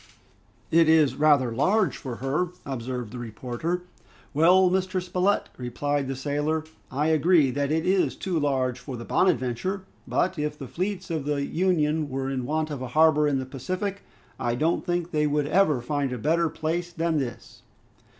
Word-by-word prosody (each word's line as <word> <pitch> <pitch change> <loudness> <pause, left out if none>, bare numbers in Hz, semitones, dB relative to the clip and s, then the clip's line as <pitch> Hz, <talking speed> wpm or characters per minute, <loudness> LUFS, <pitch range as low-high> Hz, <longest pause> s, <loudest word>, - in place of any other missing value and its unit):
"It 165 0 +5
is 155 -5 +5
rather 145 -4 +3
large 185 - +2
for 125 -3 -6
her!" 135 +9 -1 0.2
observed 125 -3 -4
the 125 - -7
reporter. 125 +10 -4 0.5
"Well! 180 +5 +5
Mr. 185 0 0
Spilett," 185 +2 0
replied 140 +3 -2
the 135 - -3
sailor, 145 +3 -1 0.3
"I 150 +4 0
agree 160 -2 +4
that 140 +2 -1
it 160 +1 +1
is 185 0 +2
too 180 -4 -2
large 130 -4 0
for 125 0 -7
the 115 - -7
'Bonadventure,' 185 +4 0 0.2
but 185 -2 0
if 150 0 -2
the 135 - -7
fleets 185 - -3
of 155 -4 -2
the 145 -1 0
Union 155 -4 +1
were 135 0 -2
in 130 -2 -3
want 155 +1 -1
of 140 -3 -5
a 130 - -4
harbor 155 -2 +5
in 140 -2 +1
the 130 - -3
Pacific, 185 +10 -4 0.4
I 120 0 0
don't 160 +7 +1
think 175 -1 -2
they 150 -1 +2
would 150 0 +1
ever 155 -5 +3
find 140 +1 -1
a 125 - -3
better 165 +7 +1
place 165 +3 -3
than 165 -2 0
this!" 130 -4 -6
150 Hz, 175 wpm, -26 LUFS, 135-170 Hz, 0.5 s, It